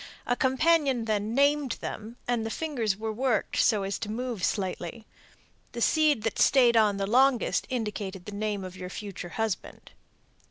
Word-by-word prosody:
A 245 - +1
companion 265 -2 +2
then 215 +1 -1
'named' 285 -2 +3
them, 220 +3 -7
and 240 -2 0
the 225 - -3
fingers 235 -8 -1
were 220 0 -3
worked 245 0 0
so 210 -3 +3
as 195 +1 -3
to 210 - -5
move 235 -3 -4
slightly. 190 +2 -2 0.7
The 235 - -5
seed 300 -4 +3
that 225 - -2
stayed 245 -3 +5
on 210 -3 +4
the 195 - -1
longest 255 +3 +2
indicated 205 -6 -4
the 210 - -7
name 205 -1 -3
of 185 0 -8
your 180 -1 -7
future 195 -2 -7
husband." 220 0 -4
225 Hz, 165 wpm, -28 LUFS, 205-255 Hz, 0.7 s, stayed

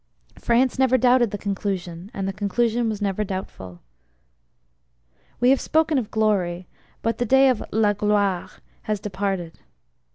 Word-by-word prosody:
France 250 +2 +1
never 260 -1 +4
doubted 245 -1 +4
the 205 - -4
conclusion; 190 -3 -4
and 195 -1 -4
the 195 - -2
conclusion 225 +3 0
was 210 -1 -3
never 200 +1 -1
doubtful. 140 - -7 1.6
We 245 +1 +4
have 270 - +3
spoken 315 -2 +2
of 225 -4 -5
`glory,' 190 -5 0 0.4
but 230 0 -1
the 245 - +1
day 265 +3 +5
of 250 -4 +1
` - - -6
la 215 -2 +2
gloire 205 -3 0 0.2
' - - -36
has 210 -1 0
departed. 190 -4 -4
210 Hz, 155 wpm, -23 LUFS, 195-240 Hz, 1.6 s, day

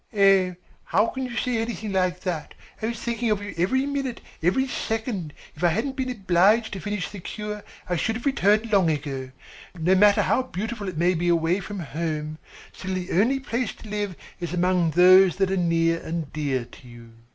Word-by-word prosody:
"Oh, 195 -2 +5 0.3
how 215 - +3
can 260 +2 -3
you 240 -1 -7
say 245 -2 0
anything 225 -2 -3
like 185 -1 +1
that. 175 -5 -4 0.3
I 220 - 0
was 235 0 -3
thinking 235 0 -2
of 210 -2 +2
you 205 - -6
every 210 +11 +1
minute, 275 -4 -3 0.2
every 190 +11 +2
second. 220 - -3 0.2
If - - -9
I - - +6
hadn't 225 - -1
been 260 -1 -2
obliged 205 0 +3
to 190 - -4
finish 205 -1 -3
the 205 - -8
cure, 210 +2 -6 0.2
I 180 - 0
should 225 +7 0
have 235 - -6
returned 220 -4 +2
long 190 -5 +4
ago. 140 -3 -3 0.5
No 170 +3 +2
matter 205 +2 +5
how - - +2
beautiful 220 -3 -4
it 175 - -7
may 175 +3 +3
be 175 0 -1
away 170 +2 +2
from 200 0 -6
home, 155 0 -4 0.3
still 190 0 -4
the 180 -1 -4
only 235 +9 +3
place 250 -3 -2
to 220 - -12
live 205 -3 -2 0.2
is 175 -1 -4
among 180 -1 +2
those 185 +2 +6
that 195 -1 +1
are - - +1
near 165 -2 +2
and 160 -3 -4
dear 140 -5 -1
to 125 +1 -16
you." 120 -1 -13
190 Hz, 200 wpm, -25 LUFS, 170-220 Hz, 0.5 s, I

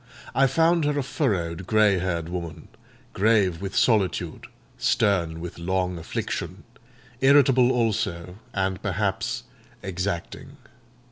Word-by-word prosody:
I 135 0 +4
found 165 +3 +3
her 145 0 0
a 140 - 0
furrowed, 95 - -2
grey 105 -3 +4
haired 85 -3 -2
woman, 85 -3 -6 0.4
grave 100 -5 +2
with 95 0 -5
solitude, 100 - +1 0.3
stern 90 -8 +1
with 85 0 -7
long 90 0 -1
affliction, 80 - -4 0.6
irritable 135 -2 +5
also, 100 -6 -1
and 95 -1 -1
perhaps 100 -1 -2 0.4
exacting. 95 -1 -4
95 Hz, 110 wpm, -25 LUFS, 90-115 Hz, 0.6 s, irritable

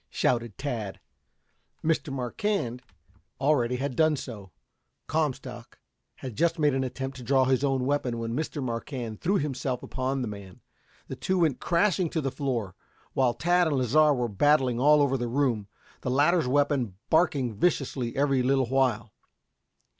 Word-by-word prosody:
shouted 120 -4 0
Tad. 120 -8 -4 0.9
Mr. 160 -2 0
Marquand 130 - -2 0.6
already 130 -3 +2
had 130 0 -3
done 155 +1 +3
so. 105 -8 -8 0.5
Comstock 130 -6 -3 0.4
had 130 -4 -8
just 170 +4 +1
made 150 -3 +3
an 135 0 0
attempt 135 +1 -5
to 125 - -9
draw 130 +2 +3
his 130 +1 +1
own 135 -2 +1
weapon 130 -4 0
when 115 0 -3 0.3
Marquand 115 -2 -5
threw 195 +4 +1
himself 135 -4 -2
upon 130 0 -2
the - - -3
man. 100 -3 -9 0.5
The - - -5
two 190 - -1
went 155 -6 +2
crashing 180 0 +1
to 160 - -2
the 135 -2 -2
floor, 125 -8 -2 0.4
while 125 -3 +2
Tad 175 +1 +2
and 145 -3 0
Lasar 145 +4 +4
were 125 -2 -1
battling 125 +2 +2
all 150 +2 +5
over 135 -1 +1
the 120 - -2
room, 120 -5 0 0.3
the - - -3
latter's 150 +4 +3
weapon 135 -6 +1 0.2
barking 140 -8 +2
viciously 130 - -1
every 135 -1 +2
little 135 +1 +2
while. 125 -5 +1
135 Hz, 155 wpm, -27 LUFS, 120-145 Hz, 0.9 s, all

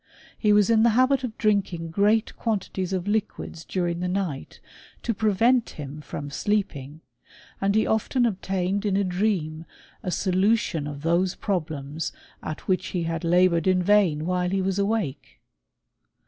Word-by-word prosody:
He 210 - +2
was 210 +1 +4
in 220 -1 +5
the 235 - +5
habit 260 +1 +3
of 230 -3 -5
drinking 190 -6 0
great 210 +5 +2
quantities 195 -4 -2
of 185 0 -2
liquids 205 -5 -2
during 175 -1 -2
the 180 - -1
night, 180 -7 -3 0.4
to 230 - 0
prevent 225 +4 +2
him 150 0 -7
from 145 0 -6
sleeping; 155 -6 -2 0.6
and 200 +1 +2
he 220 - +3
often 240 +3 +1
obtained 195 -2 -1
in 200 -2 +1
a 200 - +2
dream 180 -4 -1 0.4
a - - -4
solution 185 -4 +1
of 145 0 -7
those 175 +3 +1
problems 155 -5 -3 0.3
at 155 - -6
which 185 -1 +1
he 175 -2 -2
had 165 +1 -3
laboured 175 0 +3
in 185 -1 +3
vain 180 -6 +3
while 180 0 0
he 195 +1 0
was 190 +1 0
awake. 200 -8 -2
185 Hz, 155 wpm, -25 LUFS, 165-210 Hz, 0.6 s, in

